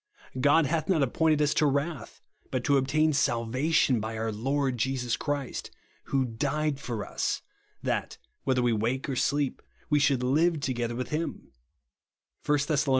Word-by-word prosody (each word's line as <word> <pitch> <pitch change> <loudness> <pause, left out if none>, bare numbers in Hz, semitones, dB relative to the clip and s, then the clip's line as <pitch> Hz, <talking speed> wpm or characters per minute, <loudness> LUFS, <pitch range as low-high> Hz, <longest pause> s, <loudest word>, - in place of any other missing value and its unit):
God 145 +4 +5
hath 155 +3 -1
not 165 -7 +3
appointed 150 +3 +2
us 150 - +2
to 150 - +3
wrath, 140 -3 -2 0.3
but 130 -2 -2
to 140 - +3
obtain 155 +4 +2
salvation 130 +2 +2
by 110 +1 -4
our 110 0 -1
Lord 130 +3 -1
Jesus 125 -1 0
Christ, 145 -3 -3 0.4
who 135 -1 +1
died 140 +4 -1
for 115 -6 -4
us, - - -2 0.4
that, - - -2 0.3
whether 130 -2 +1
we 120 -1 +3
wake 120 +6 -1
or 135 - -2
sleep, 140 +1 0 0.3
we 150 - +5
should 135 -3 +2
live 155 +6 +2
together 120 -4 -2
with 125 +1 -4
him," 160 +2 -4 0.9
(1 150 - +3
Thess. 150 0 0
135 Hz, 155 wpm, -28 LUFS, 125-150 Hz, 0.9 s, God